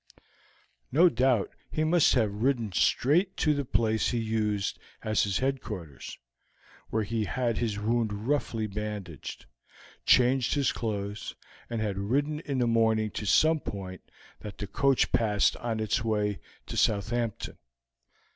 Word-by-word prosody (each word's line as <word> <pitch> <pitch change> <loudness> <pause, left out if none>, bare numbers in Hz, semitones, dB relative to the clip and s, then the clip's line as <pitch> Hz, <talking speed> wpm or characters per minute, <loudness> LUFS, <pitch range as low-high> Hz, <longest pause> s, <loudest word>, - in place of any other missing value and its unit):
"No 170 +6 +6
doubt 125 -7 +2 0.2
he 155 - -1
must 160 -1 +4
have 110 -5 +2
ridden 120 -5 +1
straight 165 - +2
to 150 - +3
the 140 -1 -1
place 110 -3 +1
he 120 - -1
used 110 -3 -1 0.2
as 110 -1 +2
his 100 -2 0
headquarters, 105 - -4 0.7
where 110 0 0
he 110 +1 -1
had 120 -2 -1
his 110 -4 -1
wound 110 +1 0 0.2
roughly 125 -6 0
bandaged, 105 - -6 0.6
changed 125 +1 +4
his 140 -2 +2
clothes, 105 -2 -4 0.3
and 115 -2 -2
had 100 -3 -2
ridden 145 +9 0
in 140 -4 -3
the 125 - +2
morning 110 -2 +2
to 105 - -5
some 155 +10 +4
point 95 -7 -7 0.4
that 105 -2 -8
the 105 - -4
coach 135 +6 +2
passed 105 -3 +2
on 115 -2 -3
its 110 0 0
way 105 -2 0 0.3
to - - -7
Southampton. 110 +2 0
110 Hz, 140 wpm, -28 LUFS, 105-130 Hz, 0.7 s, No